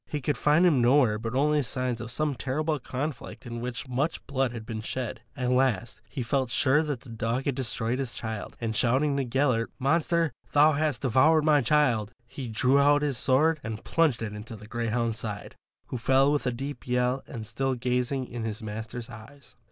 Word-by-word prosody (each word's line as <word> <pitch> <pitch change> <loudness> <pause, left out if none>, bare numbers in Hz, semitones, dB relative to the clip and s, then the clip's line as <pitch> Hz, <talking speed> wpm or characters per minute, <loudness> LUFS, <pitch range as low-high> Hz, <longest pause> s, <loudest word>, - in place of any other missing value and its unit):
He 150 - -3
could 145 +2 -1
find 150 +9 +3
him 150 -8 +4
nowhere 120 -3 +4
but 115 +2 -4
only 150 +2 +3
signs 125 -2 -2
of 115 - -6
some 150 +4 -1
terrible 145 +4 -1
conflict 135 +1 -5
in 120 -1 -5
which 125 +2 -5
much 135 +6 -2
blood 135 -2 0
had 115 -2 -7
been 110 -1 -5
shed. 115 0 -4 0.2
At 125 -1 0
last 125 -4 +1
he 125 - -4
felt 130 +1 0
sure 135 +4 +3
the 150 -2 -2
dog 115 +1 -3
had 140 - +1
destroyed 125 -1 -2
his 130 -3 -2
child, 110 -2 -5
and 115 -2 -2
shouting 135 +6 +2
to 140 - +1
Gellert, 125 -2 +1
"Monster, 165 +3 +1 0.2
thou 150 +2 +6
hast 150 -2 -1
devoured 150 +5 +4
my 150 -2 +5
child," 120 -6 +2
he 130 +1 -7
drew 125 +5 +3
out 145 +1 +4
his 140 -5 0
sword 155 +5 +3
and 110 -1 -5
plunged 155 -9 +1
it 105 -2 -4
in 105 - -6
the 110 -1 -10
greyhound's 115 0 -1
side, 105 -2 -6 0.4
who 125 - -4
fell 135 +4 +4
with 145 -3 0
a - - +2
deep 135 +2 -6
yell 125 +1 +1
and 110 -2 -7
still 130 +4 -1
gazing 125 +2 -1
in 120 -2 -6
his 110 -1 -4
master's 110 +3 -6
eyes. 125 +3 -13
125 Hz, 200 wpm, -27 LUFS, 115-145 Hz, 0.4 s, thou